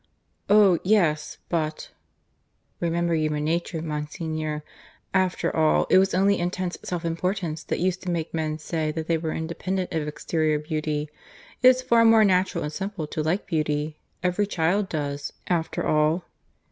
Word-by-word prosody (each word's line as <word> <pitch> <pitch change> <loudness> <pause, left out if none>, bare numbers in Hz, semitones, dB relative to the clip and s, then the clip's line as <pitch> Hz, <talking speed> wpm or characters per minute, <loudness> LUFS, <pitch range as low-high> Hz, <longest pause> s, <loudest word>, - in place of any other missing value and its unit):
"Oh 200 -4 +6
yes; 175 -7 +2
but 155 -2 -2 0.4
" - - -45
"Remember 170 0 0
human 155 -2 0
nature, 165 0 -1
Monsignor. 155 0 -3 0.5
After 185 -2 +1
all, 155 -1 +3
it 185 - +8
was 190 -1 +2
only 200 +1 +3
intense 180 +1 -2
self 175 -1 -4
importance 170 -1 -2
that - - -1
used 185 +1 0
to 185 - -5
make 170 -2 -2
men 155 -1 -1
say 155 0 -2
that 160 0 -3
they 165 0 +1
were 160 -1 -3
independent 180 +3 -3
of 155 -2 -1
exterior 155 0 0
beauty. 150 0 -2 0.5
It's 255 0 +6
far 235 -2 +4
more 225 -1 +6
natural 185 -1 +2
and 150 +1 -4
simple 195 -3 -4
to 155 +1 -3
like 165 +7 0
beauty. 150 -3 -1 0.2
Every 180 +3 +1
child 185 +2 +1
does, 145 -2 -3
after 170 -3 -1
all." 155 +3 +2
165 Hz, 155 wpm, -25 LUFS, 155-185 Hz, 0.5 s, it